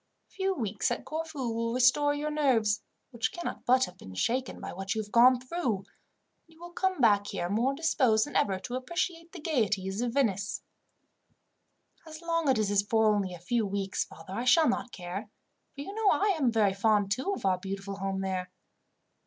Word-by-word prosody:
A - - -38
few 385 0 -1
weeks 215 - -1
at - - -3
Corfu 310 -6 -4
will 230 +1 -1
restore 275 +4 +4
your 300 +1 -2
nerves, 230 -9 +2 0.3
which 235 -2 -1
cannot 345 - -6
but 255 +1 +5
have 180 +1 -13
been 95 -1 -11
shaken 255 - -1
by - - -6
what 195 +2 -3
you 220 - 0
have 205 - -15
gone 245 +2 +6
through, 255 -2 -1
and 195 - -13 0.6
you 325 0 -22
will 345 0 -10
come 375 -1 -1
back 205 -4 +4
here 175 - -3
more 245 +6 +1
disposed 260 -8 +2
than 290 - -10
ever 195 -2 +2
to 245 - -7
appreciate 335 +5 -3
the 365 - -9
gaieties 215 - 0
of 240 -1 -1
Venice." 205 -8 0 1.4
"As 310 -1 -9
long 335 -3 0
as 260 - +4
it 210 -2 +1
is 200 - +4
for 220 +1 +3
only 195 -3 -1
a - - -12
few 225 +7 0
weeks, 195 -1 -2
father, 190 - -11
I 235 - -2
shall 315 +4 +5
not 245 0 -1
care; 190 +4 -6 0.5
for 280 - -6
you 390 +8 -7
know 435 -1 +2
I 400 -1 +3
am 270 -7 +2
very 210 -4 +3
fond, 205 0 +2
too, 260 - 0
of - - -7
our 185 -2 +2
beautiful 195 +1 -5
home 195 0 -2
there. 185 -1 -3
235 Hz, 200 wpm, -29 LUFS, 200-295 Hz, 1.4 s, gone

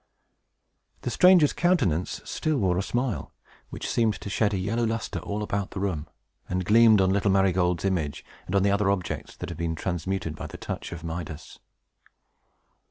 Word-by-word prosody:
The - - -3
stranger's 180 -5 +6
countenance 105 - +1
still 155 -2 -1
wore 95 -6 +1
a - - +1
smile, 120 +3 -2 0.4
which - - -6
seemed 110 -3 +1
to 100 - -6
shed 105 +2 +2
a 100 - -1
yellow 105 +6 -1
lustre 115 0 -2
all 105 +1 -4
about 100 -1 -2
the - - -6
room, 85 -6 -2 0.4
and 90 0 -1
gleamed 110 0 +6
on 95 0 +3
little 100 0 +2
Marygold's 95 -2 +2
image, 85 -7 -1 0.2
and 90 - -2
on 100 - +4
the 100 - +3
other 100 0 +2
objects 90 -4 -2
that - - -6
had 85 -2 -7
been 85 -1 -1
transmuted 90 -1 -3
by - - -6
the - - -9
touch - - -6
of 85 -2 -7
Midas. 80 -2 -6
95 Hz, 175 wpm, -26 LUFS, 90-105 Hz, 0.4 s, stranger's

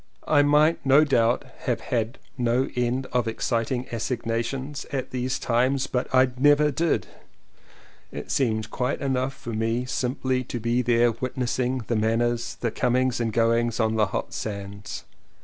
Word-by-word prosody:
I 145 -2 +5
might 150 +3 +3
no 140 +2 +6
doubt 120 -5 +2 0.2
have - - +1
had 115 +1 -2 0.2
no 125 +1 +1
end 125 +2 0
of 125 -2 +1
exciting 120 +2 -1
assignations 120 +4 -3
at 135 -3 -3
these 130 +1 -1
times 130 +3 +1
but 125 0 -2
I 130 0 +5
never 145 +2 +5
did; 165 +4 0 1.1
it - - -6
seemed 110 -5 0
quite 125 +2 -1
enough 135 -1 -1
for 120 - -7
me 115 +3 0
simply 130 0 -1
to 120 - -4
be 120 +2 +1
there 120 -1 +3
witnessing 125 +1 -2
the 120 - -1
man 110 +1 +2
ners, 120 0 -1
the 115 - 0
comings 125 +1 +1
and 115 -1 0
goings 115 +1 +1
on 110 -1 +2
the 110 -2 +2
hot - - -4
sands. 100 -1 -6
125 Hz, 155 wpm, -25 LUFS, 115-130 Hz, 1.1 s, no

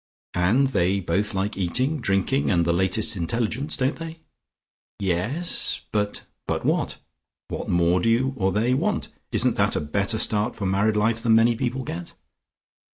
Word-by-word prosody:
And 100 +10 +3
they 95 -4 +1
both 100 +4 -1
like 100 +2 -1
eating, 125 - 0
drinking 100 +7 +1
and 85 -3 +2
the 85 - +2
latest 95 +5 +1
intelligence. 115 - -1
Don't 135 +1 0
they?" 165 0 -7 0.8
"Yes. 100 - 0
But 105 -1 -1
" - - -55
"But - - -2
what? - - 0 0.5
What - - -5
more 85 +1 +3
do 115 - +2
you 130 +4 +2
or 95 -5 +1
they 115 +5 +1
want? 130 - 0 0.2
Isn't - - +2
that - - +2
a - - +1
better 100 +9 0
start 110 +2 +1
for 100 - -4
married 100 +3 +2
life 110 +2 +1
than 115 -2 +4
many 115 +1 +4
people 130 +2 -2
get?" 85 -7 -7
105 Hz, 165 wpm, -24 LUFS, 95-120 Hz, 0.8 s, than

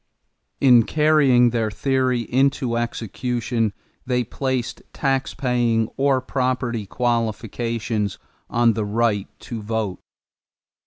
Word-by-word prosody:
In 125 -4 +7
carrying 140 -3 +4
their 115 -2 0
theory 130 +2 0
into 130 0 +1
execution 120 0 -2 0.3
they 125 -1 0
placed 130 +1 -3
taxpaying 125 -4 0
or 135 -1 +2
property 125 -4 -1
qualifications 115 -2 -1 0.3
on 120 -1 +3
the 110 - -2
right 105 -1 0
to 115 -3 -6
vote. 105 -3 -3
120 Hz, 95 wpm, -22 LUFS, 115-130 Hz, 0.3 s, In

